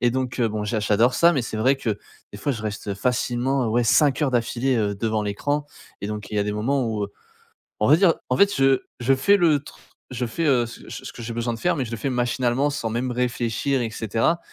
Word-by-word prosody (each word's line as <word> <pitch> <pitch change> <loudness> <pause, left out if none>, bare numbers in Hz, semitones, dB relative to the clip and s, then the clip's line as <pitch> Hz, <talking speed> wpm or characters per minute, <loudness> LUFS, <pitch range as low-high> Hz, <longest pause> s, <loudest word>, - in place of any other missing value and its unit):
et 120 -1 +3
donc, 130 -1 -2
bon, 110 -2 0
j'a 110 +1 -1
j'adore 110 +4 +3
ça, 170 +1 +5
mais 135 -6 0
c'est 110 - -5
vrai 130 +6 +3
que 110 -6 -2 0.3
des 100 - -8
fois 140 +7 -1
je 110 -4 -6
reste, 105 0 -5
heu, 100 - -1
facilement, 125 +3 0
ouais, 120 +2 +2
5 145 +5 +3
heures 140 - +2
d'affilée, 125 +2 +1
heu, 105 -2 0
devant 110 +1 -1
l'écran 145 +9 -2 0.3
et 100 - -4
donc 105 0 -6
il 105 - -3
y - - +2
a - - 0
des 105 - -2
moments 125 +5 0
où, 110 -2 -2
heu, 100 - -10 0.7
on 105 - +3
va 150 - +7
dire, 180 -2 +4 0.2
en 125 - +2
fait 200 +5 +4
je 135 -1 +3 0.2
je 130 +3 +3
fais 200 +10 +4
le 160 -5 +3
tr - - -13 0.3
je 125 -1 -2
fais, 165 +9 -3
heu, 125 -5 +3
c 115 - -11
c - - -7
ce - - -7
que 120 - -8
j'ai 115 +1 -5
besoin 120 0 -2
de - - -8
faire 175 -1 +1
mais 135 - -1
je - - -8
le - - -2
fais 135 +5 -2
machinalement 125 +2 +1
sans 115 -5 -3
même 125 +3 -2
réfléchir 125 +2 -1
et 115 - -1
cetera 115 - 0
120 Hz, 260 wpm, -23 LUFS, 110-135 Hz, 0.7 s, va